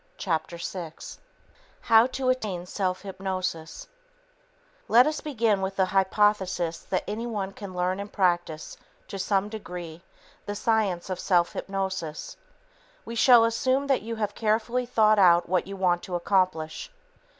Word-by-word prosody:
Chapter 170 -2 -2
6 170 -2 -7 0.6
How 225 +1 +5
to 260 0 -2
Attain 210 -9 -1
Self 185 0 -2
Hypnosis 185 -4 -4 1.0
Let 245 +3 +6
us 305 0 -2
begin 230 -9 0
with 190 0 -3
the 190 - +3
hypothesis 190 -3 +1
that 185 - 0
anyone 210 -2 -3
can 195 -2 -9
learn 180 +2 -1
and 200 +1 -6
practice, 175 -4 -1 0.3
to 195 - -6
some 195 +1 +1
degree, 180 -6 -8 0.5
the 205 - -3
science 205 -5 0
of 185 - -3
self 175 -3 +2
hypnosis. 190 -5 -4 0.7
We 230 - -6
shall 235 0 +6
assume 255 +4 +1
that 275 -2 +1
you 230 +1 -5
have 210 -2 -2
carefully 230 +3 0
thought 215 -3 +4
out 175 -2 +5
what 180 +1 0
you 195 - -6
want 175 -2 +1
to 180 - -5
accomplish. 180 - 0
195 Hz, 140 wpm, -26 LUFS, 180-220 Hz, 1.0 s, Let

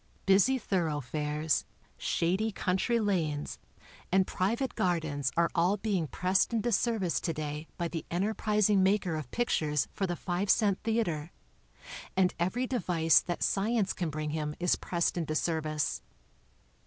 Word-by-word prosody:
Busy 200 +7 +4
thoroughfares, 150 - -1 0.3
shady 190 +6 0
country 195 +5 0
lanes 165 -9 -1 0.5
and 190 0 +4
private 230 +10 -1
gardens 155 -7 0
are 170 0 +3
all 180 +3 +2
being 195 -6 -1
pressed 185 - +1
into 235 +1 0
service 215 -5 +1
to 165 - -1
day 150 +1 -5
by 170 - -1
the 165 -1 -5
enterprising 210 +2 +2
"maker 190 -3 +2
of 155 -5 -5
pictures 150 - 0
for 195 - -1
the 175 - -2
five 180 +3 -2
cent 200 -3 +3
theater, 175 -9 -1 0.9
and 185 -2 +3
every 190 +9 0
device 175 - +3
that 175 -1 -3
science 205 0 +1
can 175 -3 -2
bring 155 0 -3
him 150 -1 -3
is 180 0 +2
pressed 170 0 -1
into 155 -2 -2
service. 155 -2 -1
180 Hz, 140 wpm, -30 LUFS, 155-205 Hz, 0.9 s, Busy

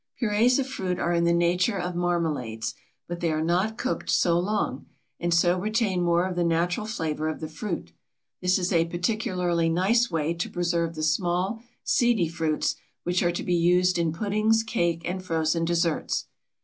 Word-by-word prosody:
Purées 230 +2 +3
of 275 - 0
fruit 190 -9 -3
are 175 - 0
in 170 0 +2
the 170 - +3
nature 175 +4 +2
of 180 -1 -3
marmalades, 160 -11 -1 0.3
but 175 0 -5
they 170 -2 0
are 155 0 0
not 185 +7 0
cooked 260 - -3
so 170 -1 +3
long, 190 -8 -2 0.3
and 175 0 -1
so 175 +2 +3
retain 210 -2 0
more 175 0 +2
of 185 -1 -3
the 175 - +1
natural 170 +5 0
flavor 155 -7 -2
of 155 - -4
the 155 - -4
fruit. 160 - -5 0.5
This 180 0 +3
is 185 0 -1
a 165 -1 +4
particularly 175 -2 0
nice 205 +8 +2
way 165 -1 0
to 170 0 -3
preserve 170 -1 -1
the 155 - -4
small, 180 +7 0 0.2
seedy 235 -8 +2
fruits, 160 -2 -1 0.3
which 175 +1 0
are 175 - +2
to 175 - -4
be 180 - 0
used 180 +1 +3
in 165 -2 +1
puddings, 215 +5 +1
cake, 170 -7 -1
and 185 +1 -3
frozen 165 -1 0
desserts. 170 -1 0
175 Hz, 180 wpm, -26 LUFS, 165-190 Hz, 0.5 s, a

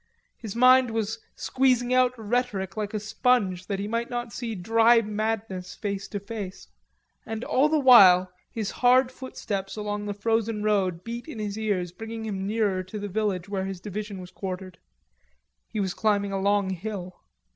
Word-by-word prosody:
His 220 -3 -8
mind 255 +1 +6
was 225 0 -2 0.2
squeezing 255 -2 +1
out 255 0 +3
rhetoric 215 -5 -2
like 215 0 -3
a - - 0
sponge 205 -4 +1
that 200 - -2
he 200 +1 -3
might 230 +2 -2
not 240 -3 -4
see 230 -1 -4
dry 225 +5 +4
madness 210 -4 -3
face 200 -2 -4
to 205 - -4
face. 200 -2 -7 0.6
And 225 +1 -5
all 280 +4 +2
the 310 - +3
while 190 -10 +7 0.2
his 215 -3 -3
hard 255 +1 +5
footsteps 205 -7 -5
along 210 -1 -3
the 205 - -3
frozen 225 0 0
road 190 -5 +1
beat 235 +3 -6
in 310 - -8
his 210 -2 -3
ears 200 -5 -1
bringing 225 +4 -7
him 195 -2 -3
nearer 205 -3 +1
to 185 +3 -8
the 205 0 -5
village 195 -3 -1
where 195 -1 -2
the 195 0 -4
division 205 +1 -6
was 180 0 -10
quartered. 185 -1 -6 0.9
He 215 - -5
was 190 -3 -1
climbing 205 -2 +1
a 195 - -1
long 200 -1 +2
hill. 185 -1 -6
210 Hz, 175 wpm, -26 LUFS, 195-230 Hz, 0.9 s, while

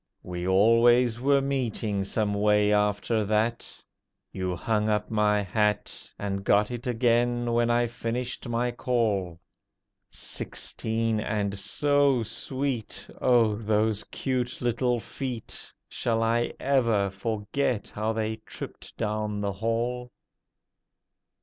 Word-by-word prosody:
We 90 0 -4
always 115 +4 +5
were 140 +1 +4
meeting 115 -7 -1
some 105 +1 -1
way 105 0 +3
after 105 +2 +1
that. 110 +3 0 0.6
You 95 -1 -2
hung 105 +4 0
up 105 0 0
my 105 -1 +2
hat, 105 +2 -1
And 100 -1 -3
got 105 +3 +3
it 120 0 -5
again, 120 0 +2
when 120 0 +2
I 120 0 +3
finished 120 +2 -4
my 120 +1 0
call. 105 -9 -1 0.7
Sixteen, 110 0 -3
and 100 -2 -2
so 140 +4 +2
sweet! 130 +1 -3
Oh, 120 -4 +4
those 110 0 +1
cute 125 -2 -2
little 120 0 +1
feet! 125 -1 -6 0.2
Shall 115 -1 -1
I 115 +1 +1
ever 115 -8 +2
forget 105 +3 -2
how 110 +1 -2
they 110 0 -2
tripped 110 - -9
down 105 -1 -2
the 100 -1 -1
hall? 120 +4 -2
110 Hz, 115 wpm, -27 LUFS, 105-120 Hz, 0.7 s, always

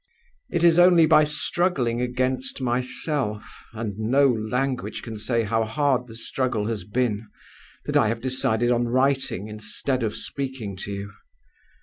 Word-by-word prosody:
"'It 170 - -1
is 170 0 +6
only 175 -2 +7
by 155 -1 +6
struggling 150 -5 0
against 130 +2 -1
myself 125 -2 -2
(and 110 -3 -5
no 135 +6 +3
language 125 +3 -2
can 115 -2 -6
say 115 +2 0
how 110 +1 +1
hard 130 +1 0
the 115 - -11
struggle 115 -2 -1
has 110 -4 -3
been) 110 +1 -1 0.6
that - - -3
I - - +5
have 115 +1 -1
decided 125 -2 +1
on 120 0 +1
writing, 130 -5 +1
instead 110 +5 -3
of 110 -2 -1
speaking 130 -8 -5
to 100 - -5
you. 100 +1 -5
125 Hz, 145 wpm, -24 LUFS, 110-135 Hz, 0.6 s, only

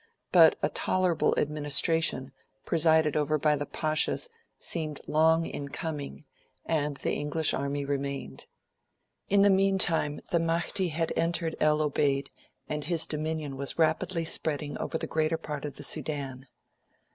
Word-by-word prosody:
But - - +6
a - - +2
tolerable 185 -3 +1
administration, 150 -1 +2 0.3
presided 160 -2 +3
over 155 0 +1
by 150 0 +2
the 145 0 -4
Pashas, 155 - 0 0.3
seemed 155 -4 -3
long 160 +2 +3
in 140 -3 -6
coming, 150 -1 -6 0.4
and 150 -3 -1
the - - -2
English 150 +2 +1
army 140 +1 -2
remained. 140 - -4 0.8
In 200 0 +4
the 200 - +5
meantime, 190 -6 +3
the 170 - +3
Mahdi 170 +3 0
had 165 0 -2
entered 165 -1 -1
El 155 0 +2
Obeid, 140 -1 0 0.4
and 150 -1 -4
his 165 0 +4
dominion 155 -2 -4
was 140 0 -3
rapidly 165 +1 0
spreading 150 -2 -1
over 160 - -3
the - - -4
greater 160 +1 0
part 150 -2 -6
of 145 - -6
the - - -7
Sudan. 135 -3 -3
155 Hz, 140 wpm, -28 LUFS, 145-165 Hz, 0.8 s, But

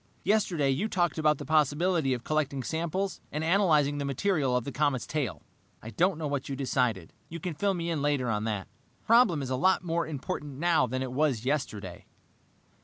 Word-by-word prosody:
"Yesterday 175 -10 +2
you 155 +11 0
talked 175 -5 0
about 150 -1 +3
the - - -7
possibility 155 0 +2
of 120 - -8
collecting 145 -3 -1
samples 170 - -2
and 150 +1 -3
analyzing 160 -5 +3
the - - -2
material 140 -2 +1
of 125 - -2
the 140 - -5
comet's 145 -3 0
tail. 145 -9 -3 0.4
I 110 - -7
don't 180 - +1
know 160 - -4
what 140 -2 -3
you 135 - -2
decided. 125 - -1 0.2
You 170 - -6
can 180 0 -4
fill 195 +5 0
me 170 -1 -2
in 155 -3 -1
later 145 -3 +1
on 105 -2 -1
that. 105 -4 -3 0.3
The - - -35
problem 220 - +4
is 130 - -5
a - - +1
lot 185 +8 +2
more 170 -1 -1
important 145 -1 -5
now 160 -4 +3
than 130 +2 -2
it 130 - -5
was 130 -4 0
yesterday. 110 - -3
145 Hz, 200 wpm, -28 LUFS, 130-170 Hz, 0.4 s, problem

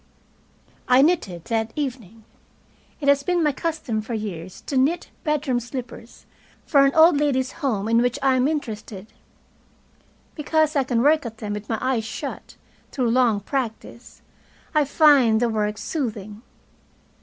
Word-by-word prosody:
I 255 +2 +5
knitted 205 - 0
that 225 -1 -1
evening. 235 -7 -5 0.8
It 280 - -3
has 280 0 +4
been 350 +3 0
my 300 - +3
custom 285 -7 -3
for 225 +2 -5
years 185 -5 -6
to 280 - -6
knit 295 +7 +1
bedroom 300 -6 0
slippers 245 -1 -9 0.4
for 280 -2 +4
an 275 - +1
old 320 -2 +6
ladies' 265 -3 0
home 220 -8 -1
in 230 +1 +3
which 245 0 0
I 265 -1 +3
am 255 +1 +2
interested. 215 -9 -5 1.3
Because 310 0 0
I 275 -2 +2
can 240 -2 0
work 305 +2 +4
at 225 -1 -10
them 210 -2 -5
with 210 0 -7
my 225 - 0
eyes 255 -4 0
shut, - - -7 0.4
through 245 -4 0
long 235 -4 +2
practise, 235 0 -6 0.5
I 305 -2 +3
find 275 -6 +4
the 240 0 +1
work 210 -1 -1
soothing. 215 -9 -5
250 Hz, 150 wpm, -23 LUFS, 220-285 Hz, 1.3 s, old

